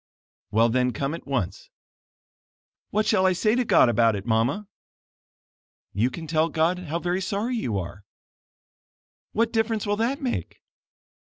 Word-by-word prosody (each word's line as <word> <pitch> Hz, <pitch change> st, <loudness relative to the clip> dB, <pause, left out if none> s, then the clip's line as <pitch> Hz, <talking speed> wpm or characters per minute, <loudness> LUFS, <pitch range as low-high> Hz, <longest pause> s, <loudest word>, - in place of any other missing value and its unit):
"Well, 115 Hz, +2 st, +4 dB
then 125 Hz, +1 st, +1 dB
come 135 Hz, +6 st, -2 dB
at 165 Hz, -, -8 dB
once." 100 Hz, -10 st, -3 dB, 1.2 s
"What 215 Hz, +1 st, +1 dB
shall 200 Hz, -4 st, +3 dB
I 185 Hz, -, +3 dB
say 215 Hz, +4 st, +1 dB
to 250 Hz, +1 st, +2 dB
God 215 Hz, -, +5 dB
about 115 Hz, -1 st, +3 dB
it, 100 Hz, 0 st, -5 dB
Mama?" 120 Hz, -, 0 dB, 1.3 s
"You 110 Hz, +6 st, +1 dB
can 160 Hz, +5 st, -7 dB
tell 160 Hz, +1 st, +1 dB
God 165 Hz, +3 st, +1 dB
how 170 Hz, -2 st, -3 dB
very 175 Hz, +2 st, -1 dB
sorry 210 Hz, +6 st, -2 dB
you 115 Hz, -, -2 dB
are." 95 Hz, +2 st, -6 dB, 1.3 s
"What 230 Hz, +1 st, +1 dB
difference 225 Hz, -1 st, 0 dB
will 205 Hz, 0 st, 0 dB
that 240 Hz, +5 st, 0 dB
make?" 255 Hz, -4 st, -4 dB
170 Hz, 150 wpm, -25 LUFS, -, 1.3 s, God